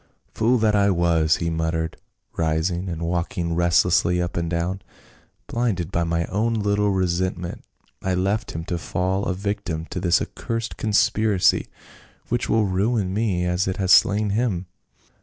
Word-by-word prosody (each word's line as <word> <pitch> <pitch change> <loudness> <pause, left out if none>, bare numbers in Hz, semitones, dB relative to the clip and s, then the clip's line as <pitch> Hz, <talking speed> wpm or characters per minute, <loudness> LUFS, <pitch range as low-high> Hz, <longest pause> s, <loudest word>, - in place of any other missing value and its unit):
" - - -43
Fool 120 +3 +2
that 110 -2 +2
I 100 0 +4
was," 85 -3 +2
he 85 -1 -2
muttered, 80 0 -2 0.4
rising 85 +3 -1
and 85 -1 -4
walking 85 0 -2
restlessly 85 +1 +3
up 85 -1 -2
and 85 -1 -1
down, 90 +3 -2 0.3
" - - -34
blinded 100 -8 -1
by 85 -2 0
my 85 0 0
own 115 +6 0
little 105 -1 +1
resentment 90 -2 -1 0.4
I 95 -1 0
left 100 +5 0
him 80 0 -5
to 90 -2 -3
fall 95 +4 -1
a 95 - -1
victim 90 -5 -3
to - - -3
this 90 -2 +3
accursed 115 0 -4
conspiracy, 110 -2 +2 0.6
which 120 0 -1
will 110 -1 +3
ruin 100 +1 0
me 100 -5 0
as 90 +1 0
it 95 - -2
has 95 -2 0
slain 105 +1 +5
him. 105 -5 0
95 Hz, 160 wpm, -23 LUFS, 85-105 Hz, 0.6 s, slain